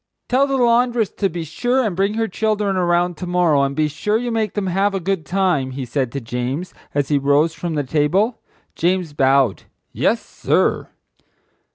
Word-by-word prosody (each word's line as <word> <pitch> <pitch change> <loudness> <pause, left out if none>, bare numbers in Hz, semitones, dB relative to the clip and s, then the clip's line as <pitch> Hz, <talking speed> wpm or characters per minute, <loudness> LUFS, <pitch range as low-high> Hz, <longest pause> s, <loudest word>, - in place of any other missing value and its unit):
"Tell 265 +2 +3
the 275 -1 0
laundress 240 -2 +2
to 195 - -1
be 170 -1 -5
sure 245 - 0
and 200 -5 -2
bring 200 +3 0
her 225 0 0
children 210 -1 -1
around 175 -1 +1
to 180 - -6
morrow, 175 -5 +3
and 140 0 0
be 155 +1 +2
sure 210 +8 -1
you 240 +1 -3
make 220 -3 -1
them 205 -2 -1
have 195 +2 +1
a - - 0
good 185 -3 -2
time," 180 -7 +1
he 135 - -3
said 130 0 -2
to 140 - -2
James, 125 +8 -4 0.2
as 145 -1 0
he 145 -2 +2
rose 145 +4 +2
from 165 0 -4
the 145 - 0
table. 165 - +1 0.3
James 175 -2 0
bowed. 135 -5 +2 0.3
"Yes, - - +1
sir." - - 0
175 Hz, 190 wpm, -20 LUFS, 145-210 Hz, 0.3 s, Tell